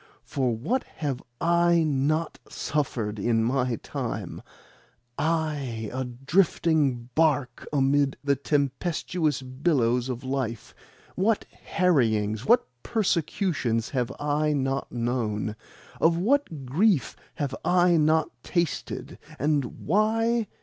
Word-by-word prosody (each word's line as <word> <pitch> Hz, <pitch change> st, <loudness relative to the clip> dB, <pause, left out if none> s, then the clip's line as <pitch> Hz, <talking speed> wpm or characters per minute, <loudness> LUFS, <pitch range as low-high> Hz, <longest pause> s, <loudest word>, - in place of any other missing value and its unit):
For 125 Hz, -5 st, -1 dB
what 240 Hz, -, -1 dB
have 140 Hz, -5 st, -3 dB, 0.2 s
I 170 Hz, 0 st, +3 dB
not 155 Hz, +2 st, 0 dB
suffered 115 Hz, -8 st, -2 dB
in 115 Hz, +2 st, +2 dB
my 125 Hz, 0 st, +1 dB
time -, -, -4 dB, 0.8 s
I, 150 Hz, -9 st, -1 dB
a 130 Hz, 0 st, -2 dB
drifting 135 Hz, -1 st, +1 dB
barque 150 Hz, -5 st, +1 dB
amid 140 Hz, 0 st, +2 dB
the 140 Hz, 0 st, +2 dB
tempestuous 145 Hz, +3 st, -1 dB
billows 130 Hz, -3 st, +1 dB
of 125 Hz, 0 st, -4 dB
life? 130 Hz, -4 st, -3 dB, 0.4 s
What 205 Hz, +4 st, +1 dB
harryings, 110 Hz, -, +1 dB
what 240 Hz, +1 st, +5 dB, 0.2 s
persecutions, 170 Hz, -, 0 dB
have 125 Hz, -2 st, -1 dB
I 150 Hz, +1 st, +1 dB
not 135 Hz, -1 st, -1 dB
known? 115 Hz, -3 st, -1 dB, 0.4 s
Of 165 Hz, +1 st, +4 dB
what 190 Hz, -, 0 dB
grief 160 Hz, -, +2 dB, 0.2 s
have 140 Hz, -3 st, -2 dB
I 175 Hz, 0 st, +4 dB
not 155 Hz, 0 st, +3 dB
tasted? 170 Hz, +1 st, -2 dB, 0.2 s
And 145 Hz, -3 st, -1 dB
why? 225 Hz, +5 st, +2 dB
145 Hz, 105 wpm, -26 LUFS, 125-170 Hz, 0.8 s, what